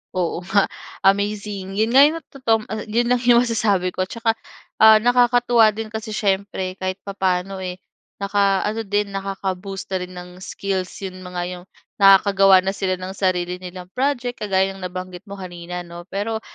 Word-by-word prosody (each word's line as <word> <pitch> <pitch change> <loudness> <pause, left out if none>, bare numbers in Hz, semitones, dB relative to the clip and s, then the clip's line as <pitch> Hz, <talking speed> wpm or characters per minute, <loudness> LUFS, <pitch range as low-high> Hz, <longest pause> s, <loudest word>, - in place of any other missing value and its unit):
Oo 175 -1 -1
nga, 195 +3 +2 0.4
amazing. 200 -1 0
Yun 220 +2 +2
nga 270 - +8
yung 310 +2 +1 0.2
totoong 225 -5 +1
ah, 220 - -5
'yon 240 +3 +2
lang 245 - 0
yung 235 - +7
masasabi 200 -5 +1
ko. 185 0 -2
Tsaka 230 -1 0 0.5
ah, 220 0 +9
nakakatuwa 245 -1 +4
din 220 +1 -4
kasi 220 0 -5
siyempre 195 -2 -1
kahit 185 0 -2
papaano 190 -1 -1
eh, 180 -1 -5 0.4
naka-ano 200 +2 +1
din 205 -1 -1
nakaka-boost 195 0 -4
na 190 - +2
rin 180 0 -7
ng 180 0 -8
skills 190 -1 -3 0.2
'yon 185 -1 -8
mga 180 -1 -5
'yong 180 0 -10 0.4
nakakagawa 195 0 +7
na 195 - 0
sila 185 -2 -1
ng 185 +1 -6
sarili 180 -2 -1
nilang 180 0 -8
project 250 -2 -1
kagaya 195 -2 +1
ng 195 - -12
nabanggit 185 0 -6
mo 200 - -7
kanina, 175 -1 -7
'no. 175 +1 -11
Pero 220 +3 -3
195 Hz, 165 wpm, -21 LUFS, 185-220 Hz, 0.5 s, ah